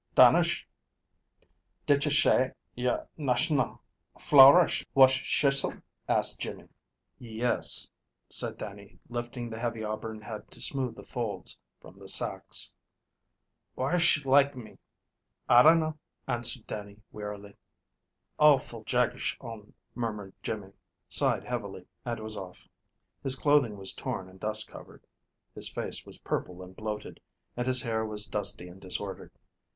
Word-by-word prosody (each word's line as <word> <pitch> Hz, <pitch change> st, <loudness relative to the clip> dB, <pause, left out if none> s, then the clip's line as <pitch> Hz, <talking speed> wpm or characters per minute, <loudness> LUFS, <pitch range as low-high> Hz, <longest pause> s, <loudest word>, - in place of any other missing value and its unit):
"Dannish, -, -, +5 dB, 1.2 s
didsh 145 Hz, +1 st, +3 dB
shay 145 Hz, -4 st, +4 dB, 0.2 s
y'r 125 Hz, 0 st, -1 dB
nash'nal 140 Hz, 0 st, 0 dB, 0.4 s
flowerish 145 Hz, +5 st, +7 dB
wash 130 Hz, -1 st, +6 dB
shisle?" 140 Hz, -1 st, +1 dB, 0.3 s
asked -, -, +3 dB
Jimmy. -, -, -6 dB, 0.5 s
"Yes," 120 Hz, 0 st, 0 dB, 0.4 s
said -, -, +1 dB
Dannie, 100 Hz, 0 st, -10 dB
lifting 120 Hz, 0 st, -5 dB
the 110 Hz, -1 st, -7 dB
heavy 115 Hz, -2 st, -3 dB
auburn 110 Hz, 0 st, -5 dB
head 110 Hz, -1 st, -8 dB
to -, -, -8 dB
smooth 130 Hz, -4 st, 0 dB
the -, -, -11 dB
folds 115 Hz, -5 st, -4 dB, 0.2 s
from -, -, -16 dB
the -, -, -12 dB
sacks. -, -, +2 dB, 1.0 s
"Whysh 155 Hz, +2 st, +2 dB
like 140 Hz, +1 st, +4 dB
me?" 120 Hz, -4 st, -11 dB, 0.7 s
"I 120 Hz, 0 st, +7 dB
dinna," 155 Hz, +1 st, +4 dB, 0.3 s
answered 120 Hz, 0 st, -2 dB
Dannie 105 Hz, 0 st, -8 dB
wearily. 105 Hz, -1 st, -8 dB, 0.8 s
"Awful 135 Hz, -7 st, +3 dB
jagsh 125 Hz, 0 st, 0 dB
on," 115 Hz, -4 st, -10 dB, 0.2 s
murmured 105 Hz, -5 st, -5 dB
Jimmy, 105 Hz, -3 st, -5 dB, 0.4 s
sighed -, -, +2 dB
heavily, -, -, -5 dB, 0.2 s
and 120 Hz, -2 st, -3 dB
was 110 Hz, 0 st, -2 dB
off. 95 Hz, -3 st, -9 dB, 0.5 s
His 135 Hz, -1 st, +3 dB
clothing 140 Hz, -7 st, +2 dB
was 95 Hz, -1 st, -1 dB
torn 95 Hz, -, -5 dB
and 95 Hz, 0 st, -17 dB
dust 110 Hz, +2 st, -1 dB
covered, -, -, -14 dB, 0.5 s
his -, -, -4 dB
face -, -, -5 dB
was -, -, -10 dB
purple 90 Hz, 0 st, -4 dB
and 90 Hz, 0 st, -13 dB
bloated, 105 Hz, 0 st, -6 dB, 0.4 s
and 120 Hz, +1 st, -3 dB
his 130 Hz, -1 st, +4 dB
hair 110 Hz, -2 st, -1 dB
was 105 Hz, -1 st, -1 dB
dusty 100 Hz, -4 st, -2 dB
and 90 Hz, +2 st, -14 dB
disordered. 95 Hz, +1 st, -3 dB
115 Hz, 125 wpm, -29 LUFS, 105-130 Hz, 1.2 s, flowerish